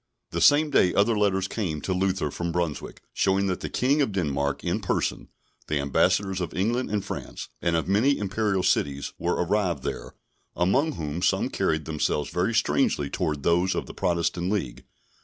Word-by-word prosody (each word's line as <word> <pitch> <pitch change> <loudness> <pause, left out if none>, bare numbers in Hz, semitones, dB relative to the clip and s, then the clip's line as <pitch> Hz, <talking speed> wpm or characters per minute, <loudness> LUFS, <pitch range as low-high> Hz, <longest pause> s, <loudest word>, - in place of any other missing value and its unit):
The - - -2
same 150 +1 +5
day 90 - +3
other 105 +3 +3
letters 95 -2 +1
came 90 -10 -3
to 95 - -1
Luther 95 -4 0
from 85 +2 -3
Brunswick, 85 -3 -3
showing 95 0 +2
that 90 -2 -1
the - - -5
King 140 +4 +2
of 135 - +1
Denmark 70 -6 -1
in - - 0
person, - - -2 0.4
the 75 - 0
Ambassadors 95 +7 +1
of 85 -1 -4
England 115 +7 0
and 100 -1 -2
France, - - -6
and 85 -1 +1
of 80 - -1
many 115 +9 +3
Imperial 100 -1 0
cities, 70 -4 0
were 85 - 0
arrived 90 0 0
there, - - -5 0.4
among 135 - +2
whom, 80 - -4
some - - +1
carried 80 -1 0
themselves 75 -2 -1
very 95 +6 0
strangely 110 - +1
towards 80 -6 -2
those 90 +3 +2
of - - -2
the - - -10
Protestant 85 0 -1
League. 90 -13 -3
90 Hz, 175 wpm, -26 LUFS, 80-105 Hz, 0.4 s, same